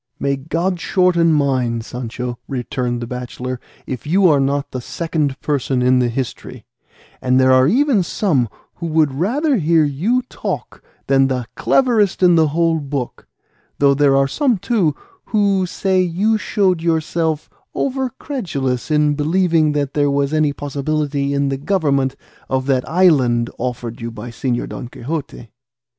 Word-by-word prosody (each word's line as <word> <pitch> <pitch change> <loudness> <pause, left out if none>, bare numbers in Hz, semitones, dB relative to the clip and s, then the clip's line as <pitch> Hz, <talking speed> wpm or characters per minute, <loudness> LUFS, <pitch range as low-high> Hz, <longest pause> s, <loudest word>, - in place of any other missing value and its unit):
"May 140 0 0
God 170 +6 -2
shorten 170 -2 +2
mine, 130 -6 +1
Sancho," 120 +1 -5
returned 120 -2 -3
the - - -3
bachelor, 125 +1 -5 0.3
"if 130 +1 -6
you 185 +4 +4
are 145 -3 +4
not 140 +1 -1
the 130 - -4
second 155 -1 -2
person 135 -3 0
in 125 0 +4
the 125 - +2
history, 125 +1 -5 0.6
and 130 0 +2
there 130 0 +5
are 130 0 +5
even 255 - +3
some 160 - 0 0.3
who 170 - -4
would 155 -3 +2
rather 255 - +1
hear 165 -2 +3
you 185 - 0
talk 250 - -6 0.2
than 135 -1 +3
the 130 -2 -2
cleverest 215 - +2
in 180 -1 +6
the 160 -2 +4
whole 165 +2 +1
book; 140 -3 -5 0.5
though 140 -1 +4
there 140 -1 +3
are 135 0 +3
some, 255 - +1
too, 180 - 0 0.3
who 200 -3 +1
say 190 +1 +1
you 185 +5 +1
showed 195 -5 +1
yourself 160 -1 0 0.3
over 265 -1 -1
credulous 150 - -3
in 150 -1 +3
believing 160 0 +2
there 145 0 0
was 140 +1 0
any 155 -2 +2
possibility 145 0 -2
in 140 0 +1
the 135 - -2
government 140 -5 0 0.3
of 130 0 0
that 130 -2 0
island 135 -10 +3
offered 120 -1 -4
you 115 - -4
by 115 +1 -8
Señor 120 0 -2
Don 125 - -7
Quixote." 130 -2 -6
145 Hz, 150 wpm, -19 LUFS, 130-175 Hz, 0.6 s, in